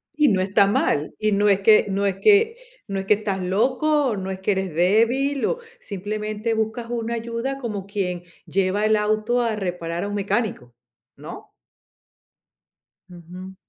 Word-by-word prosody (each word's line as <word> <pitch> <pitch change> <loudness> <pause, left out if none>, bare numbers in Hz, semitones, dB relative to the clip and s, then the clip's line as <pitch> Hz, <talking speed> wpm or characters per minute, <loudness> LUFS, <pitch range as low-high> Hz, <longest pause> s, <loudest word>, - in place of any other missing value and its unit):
Y 300 0 +4
no 195 -7 +2
está 195 +1 +3
mal. 150 -6 0
Y 215 0 +1
no 205 +1 +3
es 200 -1 +3
que 215 +2 +6
no 200 +1 0
es 195 -1 0
que 435 +2 +5 0.3
no 195 -2 -3
es 190 - -5
que 205 - +5
estás 200 -2 -3
loco, 255 +7 +1
no 190 0 -4
es 190 0 -5
que 200 - +1
eres 190 -3 -2
débil, 230 - +2
o 480 - 0 0.2
simplemente 215 - -4
buscas 220 +1 -2
una 235 -1 -2
ayuda, 235 +4 -3
como 210 -6 -4
quien 180 -4 -3 0.2
lleva 195 +2 0
el 215 0 +3
auto 215 +3 +1
a 230 -2 0
reparar 175 -3 -3
a - - -3
un 205 - -4
mecánico, 200 - -2 0.4
¿no? - - -11 1.6
Ujú. 180 +2 -11
210 Hz, 165 wpm, -23 LUFS, 190-230 Hz, 1.6 s, que